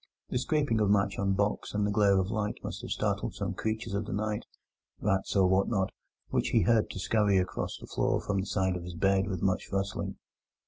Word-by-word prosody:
The 125 - 0
scraping 145 -3 +1
of 105 - +3
match 100 -1 +2
on 100 -1 +2
box 100 +1 -1
and 105 0 +2
the 105 - 0
glare 100 -2 +4
of 95 +2 0
light 105 -2 -1
must - - -5
have - - -7
startled - - -1
some - - -2
creatures 110 -1 -3
of 100 +1 -1
the - - -3
night—rats 105 -1 -3
or 95 -1 +5
what 95 +1 +3
not—which 95 -4 -2
he - - +4
heard 110 +3 +3
scurry 100 +1 +2
across 90 -1 -1
the - - -10
floor - - 0
from 100 -1 -1
the 95 - -3
side 95 -2 +1
of 90 - -5
his 90 0 -7
bed 95 +2 +2
with 95 -4 -3
much 95 -1 0
rustling. 100 0 -2
100 Hz, 210 wpm, -30 LUFS, 95-105 Hz, -, or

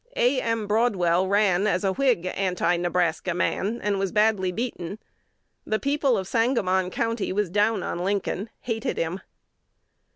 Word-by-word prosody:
A. 255 +2 +2
M. 230 -2 -1
Broadwell 190 -5 +2
ran 200 -1 +3
as 185 -2 0
a 190 -1 +1
Whig 250 -8 +1
Anti 180 -2 0
Nebraska 175 0 0
man, 205 +5 -1
and 205 -1 0
was 195 -2 -1
badly 210 -3 +2
beaten. 205 -3 -4 0.7
The 215 - 0
people 280 -2 +1
of 190 -2 -3
Sangamon 195 -6 +1
County 230 +3 -2
was 200 -2 -1
down 210 +3 +2
on - - -3
Lincoln, 200 +2 -2
hated 230 +2 -3
him." 165 +3 -2
200 Hz, 150 wpm, -25 LUFS, 185-225 Hz, 0.7 s, ran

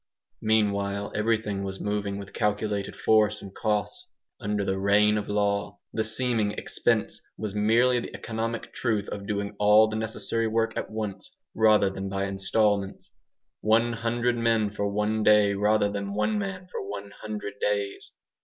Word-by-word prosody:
Meanwhile 100 -2 +1
everything 105 -2 0
was 95 0 -5
moving 100 -1 -2
with 100 -1 -9
calculated 105 -1 -1
force 105 -1 +3
and 95 -1 -10
cost, 105 -2 -2 0.3
under 105 -1 -1
the 95 0 -1
"reign 105 +2 +4
of 105 -1 -3
law". 100 0 0 0.2
The 110 - 0
seeming 110 -2 +1
expense - - -1 0.2
was 110 -2 -4
merely 115 +4 +3
the - - -7
economic 115 0 -4
truth 110 -4 -1
of 100 -1 -6
doing 100 0 -3
all 105 +1 +6
the 110 - -4
necessary 110 +1 -1
work 115 +1 0
at - - -3
once, 105 -3 -5 0.2
rather 110 -3 +4
than 95 0 -5
by 95 0 -1
instalments. 100 0 0 0.5
One 115 +2 +2
hundred 120 +1 0
men 115 -3 +2
for 100 0 -2
one 105 +2 0
day 105 -1 +5
rather 105 +1 +2
than 100 0 -4
one 210 - +1
man 195 -2 -4
for - - -4
one 100 0 -7
hundred 105 -1 -7
days. 100 -1 -2
105 Hz, 155 wpm, -27 LUFS, 100-110 Hz, 0.5 s, all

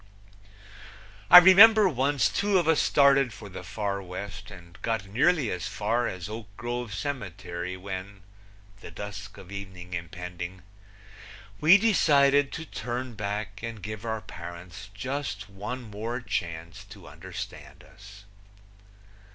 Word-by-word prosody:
I - - +12
remember 200 +4 +9
once 140 -4 +1
two 200 -1 +1
of 175 -3 +1
us 160 -2 +4
started 140 -3 +4
for 105 -1 -10
the 95 -1 -8
Far 100 0 -3
West, 100 +3 -8
and 90 -3 -14
got 115 -4 -2
nearly 130 - +2
as 90 +2 -3
far 110 +4 -1
as 90 -1 -5
Oak 110 0 -7
Grove 120 -1 -4
Cemetery, 90 - -5
when 95 +1 -7 0.6
the - - -10
dusk 105 0 -8
of 95 - -12
evening 95 -2 -8
impending 90 +1 -6 1.0
we 165 +6 +7
decided 145 -10 +4
to 160 - -5
turn 125 -1 -5
back 105 -1 -4
and 115 -4 -7
give 110 +1 -6
our 110 -1 -3
parents 85 +1 -10
just 115 -2 -4
one 125 +6 -6
more 110 +3 -5
chance 85 -7 -5
to - - -14
understand - - -9
us. 100 +2 -15
105 Hz, 130 wpm, -27 LUFS, 95-130 Hz, 1.0 s, I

